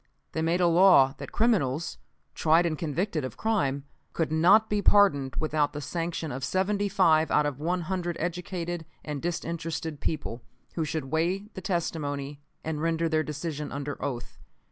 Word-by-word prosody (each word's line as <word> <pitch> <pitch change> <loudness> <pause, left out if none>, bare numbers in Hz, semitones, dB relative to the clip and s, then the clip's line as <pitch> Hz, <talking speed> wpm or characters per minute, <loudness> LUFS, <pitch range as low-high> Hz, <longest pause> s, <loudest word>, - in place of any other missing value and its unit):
They 160 - -2
made 170 +3 +1
a - - +5
law 170 -6 +6
that - - -7
criminals, 170 - +1 0.3
tried 165 +2 +3
and 165 -2 0
convicted 160 +1 -2
of 130 - -6
crime, 140 -11 0 0.3
could 165 -2 -1
not 185 +8 +5
be 210 -1 0
pardoned 145 -12 +4
without 155 -2 0
the 150 - -4
sanction 165 0 -3
of 130 +1 -5
seventy 200 +5 0
five 160 -5 +4
out 150 - +3
of 145 -2 -3
one 175 +4 0
hundred 175 -1 -3
educated 175 -1 -3 0.2
and 150 -2 -4
disinterested 165 -2 -3
people, 125 -6 -3 0.3
who 160 - -1
should 150 -3 -4
weigh 180 +6 0
the 190 - -7
testimony 145 -6 -3 0.2
and 155 -1 -3
render 165 0 +1
their 160 -1 +2
decision 150 -1 -4
under 145 0 -5
oath. 125 -3 -5
160 Hz, 165 wpm, -27 LUFS, 150-175 Hz, 0.3 s, law